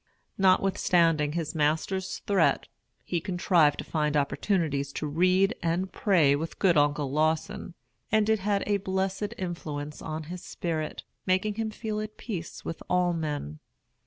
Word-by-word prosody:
Notwithstanding 175 -5 +3
his 165 -2 -2
master's 160 +5 -1
threat, 200 -2 +2 0.4
he 175 -2 -2
contrived 175 -5 +3
to - - -4
find 150 -2 0
opportunities 145 -1 0
to - - -3
read 185 +7 +3
and 175 +3 -1
pray 165 -10 +4
with 160 +3 -4
good 185 -4 +3
Uncle 145 -2 +2
Lawson; 160 +5 -1 0.4
and 215 0 +3
it 220 -1 +3
had 200 0 0
a 205 -1 +2
blessed 190 +1 -2
influence 150 -5 -5
on 155 0 -4
his 175 +3 -7
spirit, 160 -3 -3 0.2
making 185 +3 +2
him 220 +1 -2
feel 215 -1 -4
at 215 0 -7
peace 180 -8 -6
with 165 - -5
all 180 -1 +2
men. 145 - -3
175 Hz, 145 wpm, -28 LUFS, 155-195 Hz, 0.4 s, pray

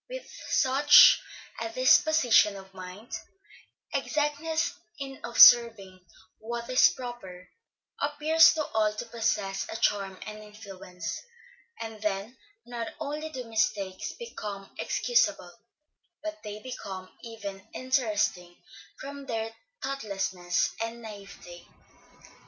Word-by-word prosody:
With - - -7 0.2
such 280 +3 +7 0.4
a 230 - -2
disposition 255 -3 +4
of 190 0 -12
mind, 185 +4 -10 0.8
exactness 310 +3 -1 0.2
in 270 -2 -7
observing 230 -6 +6 0.4
what 235 +1 -5
is 255 - +6
proper, 215 -8 -9 0.5
appears 300 +3 +5
to 310 -2 -1
all 215 -1 0
to 225 - -5
possess 220 -4 -2
a - - -5
charm 195 -4 0
and 215 0 -8
influence; 195 -4 -8 0.6
and 225 -2 -7
then 210 +3 -3 0.3
not 235 -1 -5
only 305 +1 -4
do 260 -5 -6
mistakes 210 -4 -2
become 210 - -8
excusable, 485 -1 +1 0.7
but 320 0 -6
they 210 -1 -7
become 195 -7 -7 0.2
even 200 -5 -8
interesting 210 -9 -1 0.4
from 280 0 -8
their 225 -1 -3 0.3
thoughtlessness 195 -9 -2
and 230 0 -6
naïveté. 195 -4 -11
225 Hz, 105 wpm, -28 LUFS, 195-270 Hz, 0.8 s, such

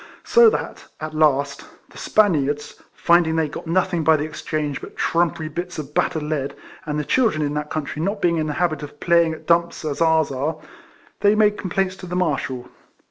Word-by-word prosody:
So 470 -1 +6
that, - - -5
at 155 0 -6
last, 140 -2 +1 0.3
the - - -14
Spaniards, 150 -8 +1
finding 170 -2 +3
they 160 -1 +1
got 150 - -8
nothing 175 0 +1
by 160 0 +5
the 145 - -2
exchange 150 -2 -3
but - - -11
trumpery 165 -2 0
bits 175 +2 -5
of 150 -1 -7
battered 160 0 0
lead, 150 -2 -3 0.3
and 150 0 -2
the 150 - -2
children 225 -12 +2
in 145 - -2
that 150 0 -3
country 155 0 -4
not 200 +5 -1
being 170 -3 +2
in 155 -1 -1
the 150 - -2
habit 165 -1 0
of 145 0 -9
phiy 170 -1 +4
ing 160 - -2
at - - -15
dumps 170 -1 +1
as 150 +1 -3
ours 160 -3 +3
are, 140 +4 -2 0.6
they 205 +1 +4
made 210 -1 +4
com 190 - -5
plaints 190 0 0
to 185 - -9
the 180 - -4
Marshal. 140 -8 -1
160 Hz, 205 wpm, -22 LUFS, 150-175 Hz, 0.6 s, So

